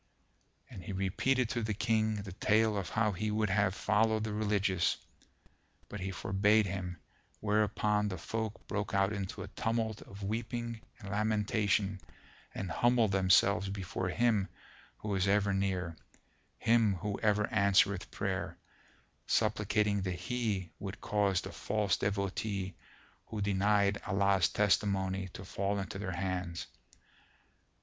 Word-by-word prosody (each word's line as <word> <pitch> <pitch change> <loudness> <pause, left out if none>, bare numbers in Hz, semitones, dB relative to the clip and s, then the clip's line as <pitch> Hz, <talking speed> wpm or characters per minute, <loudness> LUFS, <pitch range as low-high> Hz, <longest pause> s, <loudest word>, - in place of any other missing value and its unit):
And 95 - -9
he 100 - -5
repeated 110 +7 +1
to 120 - -1
the 110 -2 -2
King 110 -1 +1
the 100 - -7
tale 110 +3 +2
of 100 -3 -2
how 110 -1 +1
he 105 +3 -2
would 105 -1 0
have 100 -1 +2
followed 110 +1 +2
the 110 -1 -3
Religious, 100 -4 +1 0.9
but 105 - -6
he 95 +1 -3
forbade 100 +3 +2
him, 90 -3 -4 0.4
whereupon 105 0 +1
the 95 -2 -3
folk 110 -1 -4
broke 105 0 -2
out 100 +1 +2
into 100 -2 -4
a - - -7
tumult 110 -1 -1
of 100 +1 -10
weeping 115 +2 -3 0.2
and 100 -4 -9
lamentation 105 -2 +1 0.5
and 95 -3 -4
humbled 120 +1 +3
themselves 95 +1 +4
before 95 -1 -3
Him 110 0 +2 0.5
who 105 -1 -4
is 95 0 +1
ever 100 0 +3
near, 95 -3 -1 0.6
Him 115 -3 +3
who 100 +3 -3
ever 105 -1 +2
answereth 100 -1 +3
prayer, - - -3 0.7
supplicating 105 -1 +1
that 95 -1 -2
He 105 -5 -2
would 95 0 -6
cause 100 -3 +1
the - - -7
false 105 -1 0
Devotee 100 -1 -2 0.5
who 110 - -5
denied 100 0 +2
Allah's 100 -1 +3
testimony 95 -2 +1
to 95 - -8
fall 100 +2 -1
into 95 0 -4
their 95 -3 -3
hands. 90 -2 -3
100 Hz, 135 wpm, -32 LUFS, 95-110 Hz, 0.9 s, themselves